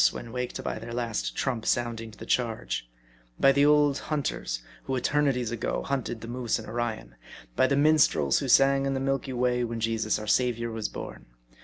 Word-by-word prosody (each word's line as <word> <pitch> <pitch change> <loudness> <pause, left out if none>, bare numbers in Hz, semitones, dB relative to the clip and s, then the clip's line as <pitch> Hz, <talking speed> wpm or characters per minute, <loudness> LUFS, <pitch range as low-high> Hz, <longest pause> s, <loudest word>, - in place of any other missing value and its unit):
when 115 - -8
waked 125 0 -4
by - - -3
their 115 +1 -7
Last 115 -3 -2
Trump 120 -5 -1
sounding 115 -2 -1
to 110 - -15
the - - -9
charge; 115 - -1 0.5
by 135 - +6
the 140 +1 +3
old 150 -1 +4
hunters, 95 - -3 0.2
who 135 - -1
eternities 130 -3 +1
ago, 120 -3 -2
hunted 125 -4 -3
the 115 - -7
moose 120 -1 -1
in - - -8
Orion; 115 - -4 0.4
by 130 - +4
the 140 - +1
minstrels, 145 - +4
who 140 - -3
sang 135 +2 +5
in 135 - 0
the - - -1
Milky 135 0 -1
Way 125 0 +1
when 115 -1 -3
Jesus 115 -1 0
our 105 - -6
Saviour 115 +1 +1
was 110 -1 -3
born. - - -8
120 Hz, 190 wpm, -27 LUFS, 115-135 Hz, 0.5 s, by